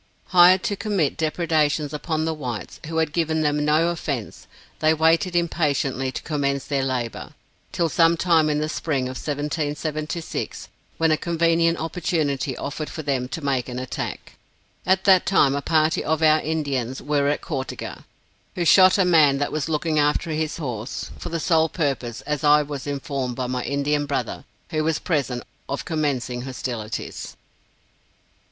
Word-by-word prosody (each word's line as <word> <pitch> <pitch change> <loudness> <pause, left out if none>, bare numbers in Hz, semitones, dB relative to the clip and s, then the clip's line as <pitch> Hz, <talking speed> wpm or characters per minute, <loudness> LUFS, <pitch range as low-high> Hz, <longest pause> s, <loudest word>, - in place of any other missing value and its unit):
Hired 185 +1 +6
to 205 - -1
commit 195 -8 0
depredations 155 -2 0
upon 155 +1 -2
the 160 - 0
whites, 125 -8 -6
who 160 0 -3
had 160 -2 +1
given 160 -2 0
them 150 0 +1
no 155 +3 +3
offence, 140 -9 -4 0.3
they 155 +1 +3
waited 165 +3 +2
impatiently 140 -6 0
to - - -6
commence 140 -3 -1
their 140 -2 0
labor, 125 -3 -3 0.4
till 170 - +1
sometime 165 -1 +3
in 150 - +1
the 155 - -1
spring 155 -4 -1
of 130 0 -4
1776, 150 +2 -3 0.3
when 160 -1 +3
a 155 - +3
convenient 165 0 +2
opportunity 155 -5 -1
offered 150 +2 -4
for 155 - -6
them 135 -3 -1
to 155 +2 -6
make 130 -2 0
an 125 - -5
attack. 130 0 -5 0.5
At 190 0 +3
that 190 -2 +5
time, 145 -8 +4
a 140 - -1
party 155 +1 +2
of 160 +1 0
our 155 0 +6
Indians 140 -5 -2
were 145 -1 0
at 145 - 0
Cau 145 -7 -3
te 130 - -7
ga, - - -7 0.6
who 175 - -1
shot 185 +3 +7
a 190 - +3
man 155 -6 +5
that 145 - -1
was 155 +1 -2
looking 155 0 0
after 150 +3 +1
his 155 0 -2
horse, 125 -6 -5
for - - -6
the 165 0 -2
sole 160 -1 +3
purpose, 135 -8 -2
as 150 -1 -3
I 150 0 +6
was 145 -2 -6
informed 140 -3 -3
by 130 - -2
my 125 0 -2
Indian 145 +1 0
brother, 135 -4 -3 0.3
who 155 -1 0
was 160 0 +1
present, 135 -7 -1 0.3
of 140 - -3
commencing 135 -6 -1
hostilities. 125 -4 -5
150 Hz, 165 wpm, -23 LUFS, 140-165 Hz, 0.6 s, shot